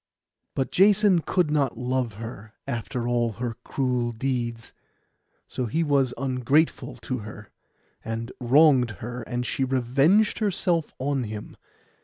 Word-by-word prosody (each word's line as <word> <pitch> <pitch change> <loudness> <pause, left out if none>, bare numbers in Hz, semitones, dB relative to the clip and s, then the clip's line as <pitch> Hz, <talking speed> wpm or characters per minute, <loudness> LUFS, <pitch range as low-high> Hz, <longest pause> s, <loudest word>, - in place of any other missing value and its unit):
But 135 - -1
Jason 200 -1 +5
could 175 -2 0
not 140 -6 +1
love 125 -1 -1
her, 110 -1 -9
after 115 +1 -3
all 120 -2 +1
her 120 +1 -4
cruel 125 -3 -1
deeds. 120 -1 -3 0.7
So 125 - -3
he 160 +9 0
was 140 -4 +2
ungrateful 135 +4 +1
to 130 -2 -3
her, 105 0 -10 0.5
and 115 +1 -4
wronged 130 -3 +4
her; 120 +1 -5
and 120 +1 -3
she 135 - -1
revenged 135 - +2
herself 180 -6 0
on 135 -1 -1
him. 105 0 -7
125 Hz, 130 wpm, -25 LUFS, 115-145 Hz, 0.7 s, Jason